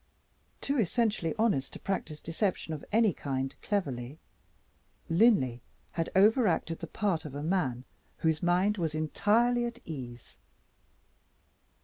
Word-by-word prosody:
Too 280 -1 0
essentially 215 -5 +1
honest 210 -12 +1
to - - -7
practice 155 -6 -3
deception 165 0 -2
of 150 - -6
any 220 -3 +4
kind 135 -2 -3
cleverly, 140 - -2 0.9
Linley 165 - +4 0.3
had 165 -1 -2
overacted 195 -5 +3
the - - -6
part 195 -7 -1
of 145 -4 -8
a 145 - -4
man 150 -8 0 0.3
whose 160 -2 +1
mind 185 +4 +2
was 160 -3 -1
entirely 225 +10 +2
at 235 0 -5
ease. 125 -6 -8
170 Hz, 120 wpm, -30 LUFS, 150-210 Hz, 0.9 s, any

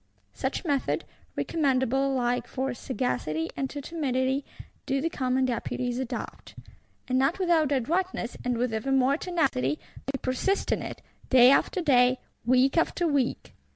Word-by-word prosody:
Such 265 +7 -3
method, 285 -4 0 0.3
recommendable 270 -3 +1
alike 245 -2 -1
to 265 0 -2
sagacity 160 - -2
and 270 -1 -2
to 290 - -6
timidity, 270 -3 -1 0.4
do 275 0 +1
the 330 +4 -1
Commons 260 -2 +1
Deputies 245 +1 -2
adopt; 260 -2 -6 0.5
and, 255 0 +1
not 270 +6 +2
without 335 -6 +2
adroitness, 285 0 -1
and 245 -1 0
with 245 -1 0
ever 220 +5 -2
more 270 +1 +4
tenacity, 235 - 0 0.3
they 275 0 -1
persist 265 +10 0
in - - +1
it, - - -7 0.3
day 255 -1 +8
after 365 +6 +2
day, 255 -5 +4 0.3
week 255 +5 +3
after 345 +1 +1
week. 280 -5 -1
265 Hz, 145 wpm, -27 LUFS, 250-285 Hz, 0.5 s, day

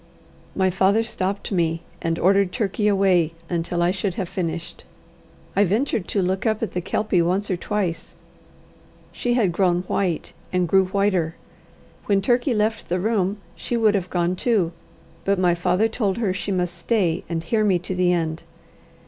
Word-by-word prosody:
My 190 -1 +2
father 195 +4 +3
stopped 200 -3 -3
me, 165 -3 0 0.2
and 165 0 -1
ordered 195 0 +3
Turkey 210 -1 -1
away 190 -5 +3 0.2
until 170 0 0
I 175 - +3
should 190 -1 -2
have 190 - -3
finished. 170 -2 -4 0.7
I 200 - +5
ventured 210 +1 0
to 200 - 0
look 190 +3 -1
up 220 0 0
at 225 - -2
the 180 - -2
Kelpie 190 0 +1
once 190 +4 0
or - - +2
twice. 180 -2 -3 1.0
She 240 -1 -1
had 215 -8 +2
grown 175 0 +1
white, 180 -3 -2 0.2
and 180 -1 +1
grew 190 +2 +4
whiter. 185 -4 0 0.7
When 200 -1 +3
Turkey 245 +5 +1
left 215 +1 -1
the 180 +1 0
room, 205 -1 0 0.2
she 240 - -3
would 220 -2 +4
have 190 -3 -1
gone 175 0 0
too. 195 -5 +1 0.5
But 200 0 +1
my 180 -1 +3
father 180 +5 +2
told 210 -4 -1
her 210 -6 0
she 200 +1 -3
must 180 -2 -1
stay 175 -2 0
and 165 -1 -2
hear 215 +6 +1
me 195 -4 +3
to 175 +2 -5
the 180 -1 +2
end. 165 -2 -1
190 Hz, 175 wpm, -23 LUFS, 175-205 Hz, 1.0 s, I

